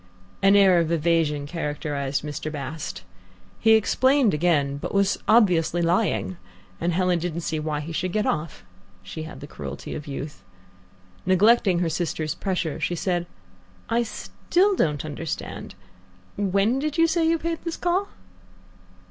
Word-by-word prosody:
An 195 +1 +5
air 190 -3 +6
of 165 -1 0
evasion 160 -3 +1
characterized 145 -3 -3
Mr. 150 +1 -4
Bast. 140 - -6 0.6
He 225 - +5
explained 260 +3 +3
again, 150 -3 +1
but 145 - -5
was 200 -1 +2
obviously 180 -6 +4
lying, 185 +1 +1 0.4
and 175 - 0
Helen 180 0 +1
didn't 170 0 -3
see 160 -1 -2
why 150 -1 -2
he 155 +3 -7
should 180 +3 -2
get 210 +2 0
off. 155 0 -3 0.4
She 160 -1 -7
had - - -11
the - - -6
cruelty 70 - -7
of 150 - -7
youth. 145 +1 -6 0.8
Neglecting 190 +1 +4
her 170 - +1
sister's 160 -1 -2
pressure, 180 -6 -2
she 175 - -1
said, 175 0 -1 0.6
"I 230 +1 +2
still 365 - 0
don't 150 - 0
understand. 155 +1 -6 0.6
When 200 +5 +1
did 300 +2 -2
you 330 - +6
say 330 0 +2
you 330 0 +3
paid 330 0 -3
this 335 -1 -4
call?" 365 +3 0
175 Hz, 150 wpm, -24 LUFS, 155-210 Hz, 0.8 s, air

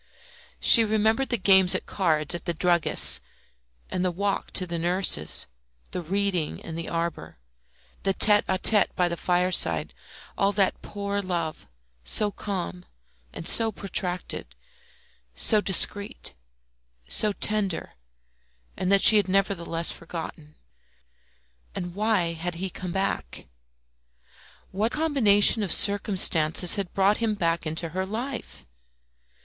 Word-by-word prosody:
She 230 - +6
remembered 220 +4 0
the 240 - 0
games 190 -2 +4
at - - -4
cards 155 -5 0
at 170 - -6
the 170 - -2
druggist's, 170 - +4 0.7
and 180 - -3
the 185 - 0
walk 200 +3 -3
to 185 - 0
the 170 -1 -5
nurse's, 175 - +1 0.5
the 180 - -5
reading 185 -2 -2
in 160 - -10
the 165 0 -6
arbour, 170 0 -5 0.6
the 195 - 0
tête 210 -1 +5
à 190 - 0
tête 210 +2 +3
by 180 -2 +1
the 170 - -4
fireside 180 +2 0 0.4
all 195 0 +1
that 195 -1 0
poor 200 0 -5
love, 170 - -5 0.4
so 205 - 0
calm 180 - -6 0.5
and 165 - -7
so 225 -1 +4
protracted, 180 - -5 0.8
so 210 - +3
discreet, 200 +1 0 0.7
so 215 - +3
tender, 205 -3 -2 0.8
and 185 - -3
that 200 0 +3
she 215 - +8
had 205 - +2
nevertheless 180 -4 0
forgotten. 160 -2 -9 1.2
And 175 -1 -6
why 200 -4 -1
had 170 +1 -6
he 185 +2 -6
come 180 0 -7
back? 180 - -4 1.3
What 215 +5 -2
combination 235 -10 +3
of 200 - -2
circumstances 180 -5 +3
had 195 -4 -3
brought 195 +2 +1
him 225 -2 -2
back 170 -3 -2
into 160 +2 -5
her 185 +3 -4
life? 225 - -7
185 Hz, 130 wpm, -24 LUFS, 170-205 Hz, 1.3 s, she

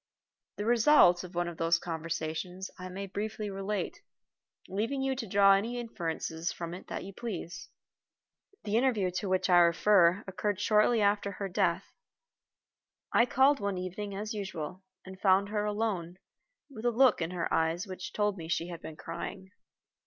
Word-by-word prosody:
The 205 - -4
result 230 -6 +5
of 180 0 -10
one 175 0 0
of 170 -1 -6
those 165 +1 +3
conversations 165 +2 -4
I 185 0 -6
may 195 +2 -5
briefly 210 +2 -4
relate, 195 +2 -3 0.7
leaving 230 +8 -2
you 270 0 0
to 245 -3 -5
draw 195 0 +6
any 225 +5 0
inferences 170 -6 -3
from 170 0 -6
it 180 - -9
that - - -5
you 195 - -9
please. 175 -7 -6 0.9
The 210 +1 0
interview 230 -7 +2
to 195 - -4
which 185 0 +1
I 175 -2 +6
refer 175 +2 +4
occurred 200 +1 -2
shortly 215 +2 +3
before 200 0 +1
her 195 +1 -4
death. 185 -3 +1 1.3
I 235 - +5
called 270 +3 +4
one 200 -2 -2
evening 195 +3 -5
as 210 +2 -4
usual, 185 -3 -5 0.2
and 190 0 -11
found 195 0 +4
her 210 0 -1
alone, 205 -5 -2 0.5
with 245 -5 -9
a - - +5
look 245 -3 +4
in 165 - -1
her 175 -2 -3
eyes 165 +3 +1
which 185 -2 -7
told 205 -1 0
me 160 - -7
she 170 +1 -1
had 170 -2 -7
been 160 - -8
crying. 170 +4 -7
195 Hz, 165 wpm, -30 LUFS, 175-210 Hz, 1.3 s, draw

